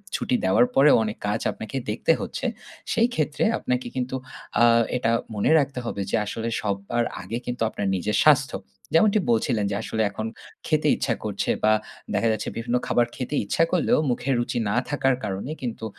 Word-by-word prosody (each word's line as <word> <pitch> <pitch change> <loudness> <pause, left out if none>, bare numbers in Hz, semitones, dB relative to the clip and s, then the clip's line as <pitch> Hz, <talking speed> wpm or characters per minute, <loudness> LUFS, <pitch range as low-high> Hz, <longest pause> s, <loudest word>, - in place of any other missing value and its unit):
ছুটি - - 0
দেওয়ার 95 +6 +5
পরেও 140 +2 +7
অনেক 105 0 -4
কাজ 105 +2 0
আপনাকে 110 +3 -8
দেখতে 110 +9 +1
হচ্ছে। 265 - -5 0.5
সেই 230 +1 +3
ক্ষেত্রে 150 -1 0
আপনাকে 125 0 -2
কিন্তু 130 0 -2 0.5
আ - - +8 0.3
এটা 115 -2 +1 0.2
মনে 105 +8 +2
রাখতে 140 -3 -1
হবে 100 - -3
যে - - +2
আসলে 115 +2 -4
সবার 100 +3 -1 0.2
আগে 100 +6 -4
কিন্তু 125 -1 -4
আপনার 100 - -3
নিজের 105 +3 -1
স্বাস্থ্য। 145 -3 +4 0.4
যেমনটি 210 +6 +5
বলছিলেন 115 -2 +1
যে - - -1
আসলে 110 - -2
এখন 110 +2 -4 0.4
খেতে - - +2
ইচ্ছা - - 0
করছে, - - -2
বা 110 0 +5 0.4
দেখা 115 - +2
যাচ্ছে 110 -1 -2
বিভিন্ন 120 +1 0
খাবার 120 - +3
খেতে 130 +3 -3
ইচ্ছা 165 - +2
করলেও 180 - +3
মুখের 130 +2 0
রুচি 120 0 -1
না - - 0
থাকার 135 -3 +2
কারণে 100 +9 -3
কিন্তু 120 -3 -4
120 Hz, 175 wpm, -24 LUFS, 105-135 Hz, 0.5 s, আ